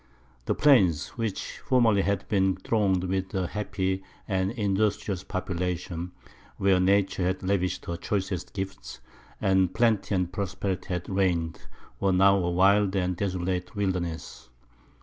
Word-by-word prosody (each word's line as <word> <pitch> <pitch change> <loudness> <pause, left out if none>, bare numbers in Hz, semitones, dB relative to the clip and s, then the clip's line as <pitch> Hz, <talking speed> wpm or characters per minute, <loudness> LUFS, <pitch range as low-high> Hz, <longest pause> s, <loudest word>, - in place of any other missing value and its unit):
The - - 0
plains, 100 - +4
which 115 -4 -4
formerly 115 -6 +3
had 100 0 -1
been 95 -3 +2
thronged 95 -2 +1
with 95 +1 -2
a 95 -1 0
happy 95 -1 -2 0.3
and 95 -2 0
industrious 100 -3 -1
population, 90 -2 -3 0.5
where 95 -1 +3
nature 95 0 +2
had 95 +1 -2
lavished 95 -1 -1
her 85 - -3
choicest 95 -3 -3
gifts, 95 -1 -6 0.4
and 95 -2 +2
plenty 110 -3 +2
and 90 -1 -1
prosperity 95 -1 -3
had 90 -2 -3
reigned, 90 -4 -1 0.3
were 95 -1 +2
now 100 +1 +5
a 90 -2 0
wild 100 +2 +3
and 90 -1 0
desolate 90 -1 -2
wilderness. 85 -9 -3
95 Hz, 130 wpm, -27 LUFS, 90-100 Hz, 0.5 s, now